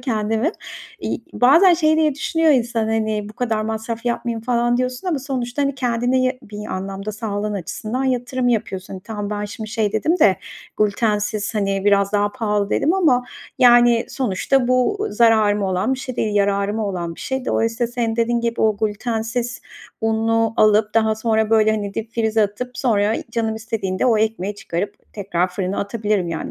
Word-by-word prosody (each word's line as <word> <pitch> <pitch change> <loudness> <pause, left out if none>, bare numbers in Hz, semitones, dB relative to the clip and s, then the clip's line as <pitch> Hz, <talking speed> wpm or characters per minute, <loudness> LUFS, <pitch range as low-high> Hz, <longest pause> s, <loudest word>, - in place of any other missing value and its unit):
kendimim. 225 +3 0 0.5
İii, - - -3
bazen 330 +9 +6
şey 315 -1 +2
diye 310 -3 +2
düşünüyor 325 +2 +1
insan, 240 -4 +1
hani, 215 -2 -1
"Bu - - -10
kadar 220 -2 -1
masraf 225 +1 -4
yapmayayım." 235 -1 -2
falan 240 0 +1
diyorsun 255 +7 -2
ama 310 -5 0
sonuçta, 260 0 -3
hani, 275 -1 0
kendine 250 0 0
ya 255 0 +2
bir 210 -1 -8
anlamda 195 +2 -5
sağlığın 210 -1 -3
açısından 215 +7 -4
yatırım 250 0 0
yapıyorsun. 195 -5 -2
Hani, 185 - -8
tamam 210 -1 -5
ben 210 0 -3
şimdi 215 +1 -7
şey 220 -3 0
dedim 320 +11 +1
de 195 -10 +5 0.4
"Glütensiz, 210 0 0
hani, 195 -1 -1
biraz 200 0 +3
daha 205 0 +1
pahalı." 210 -4 -1
dedim 330 +5 +2
ama, 265 -10 +3 0.3
yani, 240 -1 +5
sonuçta 250 +2 0
bu 400 +13 +1
zararıma 215 -4 +3
olan 185 +9 0
bir - - -8
şey 255 -2 -6
değil, 210 -1 -1
yararıma 200 +1 +1
olan 175 -3 -4
bir - - -13
şey. 265 -1 -3
Dolayısıyla, 230 +1 0
senin 230 -2 -1
dediğin 235 0 +1
gibi, 235 0 -2
o 215 -2 +3
glütensiz 225 +3 -2 0.4
unu 225 0 +1
alıp, 210 0 +3
daha 220 -1 +3
sonra, 220 0 0
böyle, 220 -1 +4
hani, 205 -2 -2
dipfrize 225 -1 0
atıp, 245 +5 -4
sonra 215 -4 +2 0.2
canım 225 -1 -1
istediğinde 220 -2 -2
o 225 -3 +3
ekmeği 210 -2 -1
çıkarıp 195 -1 -4 0.2
tekrar 185 -3 -1
fırına 185 +1 -3
atabilirim, 205 -3 -1
yani, 165 - -4
225 Hz, 170 wpm, -20 LUFS, 205-245 Hz, 0.5 s, bazen